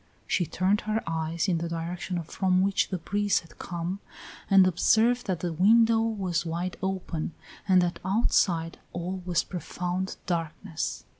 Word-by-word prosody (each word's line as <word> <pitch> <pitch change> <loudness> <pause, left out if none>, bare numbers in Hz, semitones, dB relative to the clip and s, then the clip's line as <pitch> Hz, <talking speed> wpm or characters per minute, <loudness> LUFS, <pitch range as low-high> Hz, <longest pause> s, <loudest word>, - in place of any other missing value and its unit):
She 175 +8 0
turned 190 +6 +1
her 220 +1 0
eyes 165 +2 -1
in 175 -3 +1
the 170 0 -3
direction 170 +1 -3
from 185 +3 +1
which 195 0 +1
the 185 - -1
breeze 205 +4 +1
had 165 - -19
come, 175 +3 -4 0.5
and 195 -2 +7
observed 225 +7 +3
that 180 -4 -1
the 175 -2 -2
window 225 +6 +5
was 195 -7 -1
wide 175 +2 -3
open 185 -4 -3 0.3
and 185 -2 +5
that 175 0 -2
outside 180 -4 +1
all 180 +2 -4
was 175 -2 +2
profound 180 +2 -3
darkness. 165 -2 -3
180 Hz, 150 wpm, -27 LUFS, 170-195 Hz, 0.5 s, and